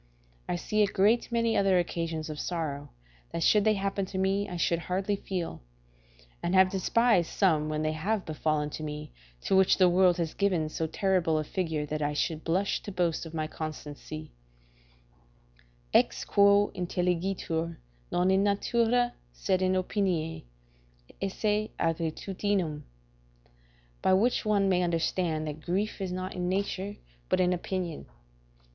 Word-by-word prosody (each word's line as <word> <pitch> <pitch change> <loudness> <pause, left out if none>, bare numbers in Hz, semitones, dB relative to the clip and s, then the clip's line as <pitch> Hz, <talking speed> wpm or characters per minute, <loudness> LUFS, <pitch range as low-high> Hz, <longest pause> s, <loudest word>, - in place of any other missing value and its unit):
I - - +1
see 210 +5 0
a 205 - +5
great 210 +5 +2
many 230 -1 +1
other 195 -2 +4
occasions 165 -2 -2
of 150 - -7
sorrow, 145 -5 -3 0.4
that 165 - -2
should 210 -1 +5
they 215 -1 +4
happen 195 0 -1
to 190 - -6
me 195 +1 +1
I 180 - -5
should 170 0 +1
hardly 190 +4 -1
feel; 185 -3 -4 0.8
and 175 +2 0
have 190 0 +6
despised 195 -1 +2
some, 155 -6 +2
when 155 0 -1
they 155 - +1
have 190 +7 -1
befallen 155 -1 -1
me, 150 -1 -6 0.3
to - - +1
which 190 0 +5
the 185 - +6
world 180 0 +4
has 165 -2 -2
given 180 -6 +1
so 160 +1 -2
terrible 175 -2 +1
a 155 - 0
figure 160 -2 -2
that 150 +1 -3
I 145 0 0
should 155 +2 -1
blush 185 +4 0
to 205 - -7
boast 175 -3 -1
of 165 - -9
my 155 -1 -1
constancy: 155 0 -7 1.6
"Ex - - +3
quo 200 0 +4
intelligitur, 175 -2 -1 0.3
non 180 +2 +2
in 190 0 +4
natura, 235 +4 +2 0.2
sed - - 0
in 185 0 +2
opinione, 185 - -1 0.8
esse 210 +2 0
aegritudinem." 165 0 -1 1.2
["By 190 - +3
which 235 +5 +2
one 205 -2 +3
may 180 -2 +3
understand 165 -2 0
that 150 0 -6
grief 195 +5 -2
is 190 -2 -2
not 185 +1 -4
in 180 -1 -2
nature, 200 +1 -2 0.3
but - - +2
in 180 0 +3
opinion." 180 -2 -4
180 Hz, 150 wpm, -29 LUFS, 160-195 Hz, 1.6 s, have